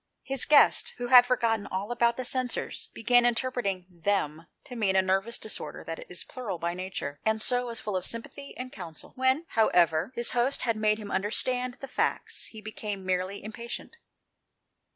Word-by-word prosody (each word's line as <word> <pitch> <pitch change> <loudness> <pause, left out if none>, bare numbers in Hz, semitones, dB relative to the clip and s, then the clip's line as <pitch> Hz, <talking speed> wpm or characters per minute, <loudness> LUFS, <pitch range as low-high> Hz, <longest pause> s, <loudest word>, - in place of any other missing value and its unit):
His 270 -1 0
guest, 300 -1 +5
who 245 0 -4
had 245 -1 +9
forgotten 230 -4 +1
all 195 +4 -3
about 235 -1 +2
the 255 - -3
censers, 255 -1 -1
began 245 +2 +4
by 240 - +5
interpreting 230 -7 -1
" - - -36 0.2
them 165 -5 0
" - - -51
to 250 - -9
mean 200 -5 +1
a 190 - +6
nervous 195 +5 +1
disorder 220 - -5
that - - -7
is - - -3
plural 225 -8 -5
by 170 +1 -2
nature, 180 -6 -5
and 220 0 +1
so 245 +2 +2
was 230 -1 -3
full 210 -2 -4
of 185 - -1
sympathy 235 +7 -6
and 255 0 -6
counsel. 165 -4 -8
When, 260 +5 +2
however, 175 -4 +3
his 235 0 0
host 245 +3 +1
had 230 -2 +1
made 215 0 +2
him 210 -2 -7
.understand 250 +6 0
the 275 - -6
facts, - - -1
he 220 - -10
became 210 -2 -5
merely 185 +2 -1
impatient. 235 - -7
225 Hz, 190 wpm, -28 LUFS, 190-245 Hz, 0.2 s, had